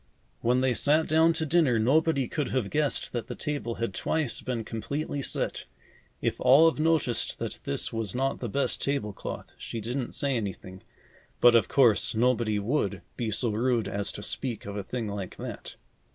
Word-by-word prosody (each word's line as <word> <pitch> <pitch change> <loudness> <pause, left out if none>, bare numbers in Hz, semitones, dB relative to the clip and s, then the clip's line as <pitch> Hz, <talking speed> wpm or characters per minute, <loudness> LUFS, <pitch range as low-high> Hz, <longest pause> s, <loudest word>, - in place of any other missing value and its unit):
When 125 +2 +2
they 130 -1 +2
sat 150 +6 +3
down 160 +2 +4
to 160 - -1
dinner, 155 -6 +3
nobody 140 +3 +2
could 150 +1 -2
have 120 -6 -1
guessed 150 -2 +1
that 120 -2 -3
the - - -5
table 120 -6 -3
had 115 -4 -3
twice 150 +5 -1
been 120 -3 -3
completely 140 +7 -4
set. - - -1 0.6
If - - -1
Olive 150 +5 +6
noticed 155 -6 +1
that - - -5
this 70 - -2
was 115 -3 -3
not 135 +2 0
the 120 - -4
best 140 +7 0
table 140 -7 -1
cloth, - - -7
she 115 - -5
didn't 120 +3 -3
say 140 -2 +1
anything, 95 -4 -5 0.6
but 120 -1 +7
of 115 -5 +4
course, 120 -5 +3
nobody 115 -2 +2
would 120 +9 -1
be 120 -3 -2
so 110 +2 0
rude 115 -1 +1
as 100 0 -2
to 105 - -7
speak 120 -1 -3
of 100 0 -6
a 105 - -2
thing 115 +2 -4
like 100 -2 -5
that. - - -7
125 Hz, 180 wpm, -28 LUFS, 110-140 Hz, 0.6 s, but